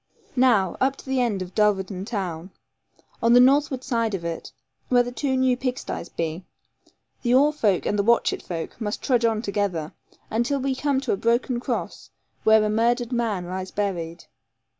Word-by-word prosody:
Now, 230 -8 +3
up 265 +1 +2
to - - -14
the 265 -1 0
end 210 -6 0
of 180 0 -11
Dulverton 195 -3 +1
town, 185 -6 -4 0.7
on 230 +1 +4
the 245 - +8
northward 265 0 +4
side 230 -5 0
of 170 -3 -6
it, 165 -1 -5 0.4
where 245 -1 +5
the 245 - -5
two 265 +1 -1
new 260 -1 +3
pig 255 0 -2
sties 170 - -6
be, 165 +2 -4 0.8
the 245 0 +2
Oare 290 +3 +5
folk 210 -11 +1
and 205 - 0
the - - +3
Watchett 235 +2 +2
folk 170 +6 -6
must 210 -1 -3
trudge 245 -3 +2
on 225 -1 +1
together, 195 -7 -2 0.4
until 240 +5 0
we 270 0 0
come 275 0 0
to - - -2
a - - +1
broken 235 +3 +1
cross, - - -4 0.3
where 220 0 +5
a - - +1
murdered 235 +3 +1
man 225 -7 -1
lies 185 +1 -5
buried. 175 -5 -3
230 Hz, 180 wpm, -24 LUFS, 190-250 Hz, 0.8 s, the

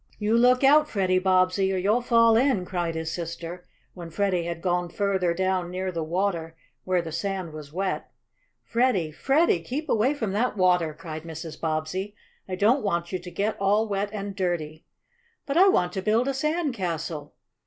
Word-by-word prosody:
"You 215 +1 +1
look 250 +2 +4
out, 300 +2 +6
Freddie 185 -3 +1
Bobbsey, 185 +1 +2
or 190 - 0
you'll 205 +6 +2
fall 230 -2 +4
in!" 235 -6 +2
cried 175 -2 -2
his 160 0 -3
sister, 170 +1 -6 0.3
when 170 -2 -9
Freddie 185 -1 0
had 170 -1 -4
gone 175 0 -1
further 190 -2 0
down 185 0 0
near 185 +1 -3
the 165 -2 -3
water 165 -1 -2 0.3
where 185 -2 +1
the 165 - -6
sand 185 -1 -3
was 150 -2 -9
wet. 190 +3 -3 0.5
"Freddie! 230 -10 +1
Freddie! 270 - +2
keep 275 - -5
away 245 +7 +2
from 220 -8 -2
that 215 +2 0
water!" 180 -4 +2
cried 160 -1 -7
Mrs. 160 0 -8
Bobbsey. 165 +6 -2 0.3
"I 185 - -2
don't 225 +9 +3
want 170 -4 -1
you 185 - -2
to 180 +1 -9
get 205 +4 -1
all 205 +3 +2
wet 200 0 -1
and 200 -2 -5
dirty." 165 -4 -3 0.6
"But 280 - -3
I 375 +4 +7
want 180 - +2
to 190 - -2
build 220 +5 +2
a 275 - 0
sand 305 +2 -1
castle." 165 -6 -4
185 Hz, 185 wpm, -25 LUFS, 170-215 Hz, 0.6 s, I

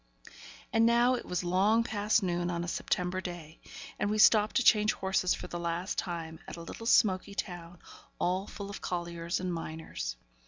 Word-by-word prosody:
And 225 0 +5
now 240 +2 +4
it 250 - -4
was 180 0 -2
long 195 +6 +3
past 215 -1 +1
noon 175 -1 -1
on 170 -1 -2
a - - -5
September 180 +1 -1
day, 170 -3 -8 0.4
and 205 - 0
we 215 - 0
stopped 215 0 +5
to 255 - +3
change 215 -2 +5
horses 190 -1 +1
for - - -8
the 175 - -5
last 170 +2 -2
time 165 -3 -5
at - - -7
a 170 - -8
little 225 +7 -7
smoky 200 -3 +3
town, 175 -3 -5 0.4
all 185 +3 0
full 200 -1 -7
of - - -8
colliers 170 -1 -3
and 180 -1 -2
miners. 160 - -5
180 Hz, 185 wpm, -30 LUFS, 170-210 Hz, 0.4 s, And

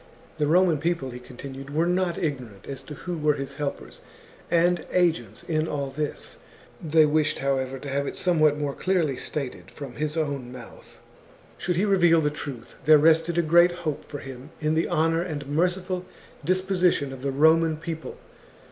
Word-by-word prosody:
The 150 - +2
Roman 170 -1 +4
people, 160 -5 -1
he 125 - -8
continued, 135 +2 -9
were 155 +4 +1
not 180 -1 0
ignorant 125 - -4
as 135 -1 -5
to 150 +2 -9
who 175 +2 -5
were 150 -1 +2
his 140 -1 -5
helpers 145 0 -5 0.5
and 175 0 +3
agents 175 -2 +1
in 155 -1 0
all 140 -3 -3
this. 150 +1 -4 0.4
They 160 -1 +5
wished, 155 0 +1
however, 135 -1 -1
to 140 - -9
have 140 +1 -1
it - - -4
somewhat 155 -5 +3
more 145 -2 -2
clearly 170 -7 0
stated 135 0 -5
from 140 -4 -9
his 155 +1 -2
own 140 -5 -2
mouth. 125 -2 -12 0.6
Should 180 0 -1
he 185 +5 +2
reveal 175 -5 +5
the 150 -2 +1
truth, 140 -5 -7
there 155 +1 +8
rested 165 +2 +3
a 170 - +3
great 170 +2 +5
hope 150 -2 -2
for 145 - -7
him 135 0 -9
in 155 0 0
the 160 +1 +1
honour 165 +1 +2
and 155 -5 -4
merciful 180 +5 0 0.4
disposition 180 -4 +1
of 130 - -9
the 140 - -1
Roman 160 +3 +4
people. 160 0 -6
155 Hz, 175 wpm, -25 LUFS, 140-170 Hz, 0.6 s, there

